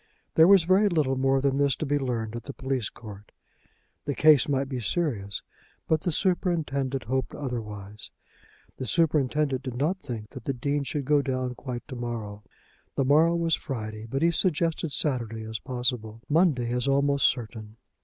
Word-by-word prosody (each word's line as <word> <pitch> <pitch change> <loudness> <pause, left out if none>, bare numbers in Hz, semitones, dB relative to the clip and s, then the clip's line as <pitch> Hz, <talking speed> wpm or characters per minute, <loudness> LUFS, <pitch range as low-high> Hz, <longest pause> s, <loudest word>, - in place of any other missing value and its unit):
There 160 +1 +7
was 195 -3 +7
very 190 +4 +4
little 150 -7 +1
more 135 +1 +2
than 140 0 +1
this 140 -2 +3
to - - -3
be 145 0 +1
learned 115 -4 -2
at 120 - -7
the 140 - -7
police 130 -4 -2
court. 105 -3 -12 0.7
The 145 - -2
case 150 -2 +5
might 135 -1 +1
be 130 -2 -4
serious, 115 - -2 0.4
but 155 -1 +2
the 175 - -1
superintendent 150 -7 0
hoped 130 +3 -2
otherwise. 105 -6 -6 0.7
The 130 - -5
superintendent 150 -3 +1
did 130 -3 -6
not 155 +9 0
think 110 - -7
that - - -10
the 135 - 0
Dean 140 +3 -1
should 145 -1 -3
go 145 +1 +4
down 130 -2 -2
quite 125 -1 -7
to 135 - -7
morrow. 115 -4 -5 0.5
The 135 - +1
morrow 160 +5 +4
was 165 -1 +1
Friday; 110 -7 -4
but 135 +5 -1
he 170 - +4
suggested 165 -2 +1
Saturday 115 -7 -1
as 110 0 -5
possible, 125 -3 -3
Monday 145 -7 +2
as 125 +2 -1
almost 140 0 +3
certain. 110 -2 -4
135 Hz, 175 wpm, -27 LUFS, 120-150 Hz, 0.7 s, There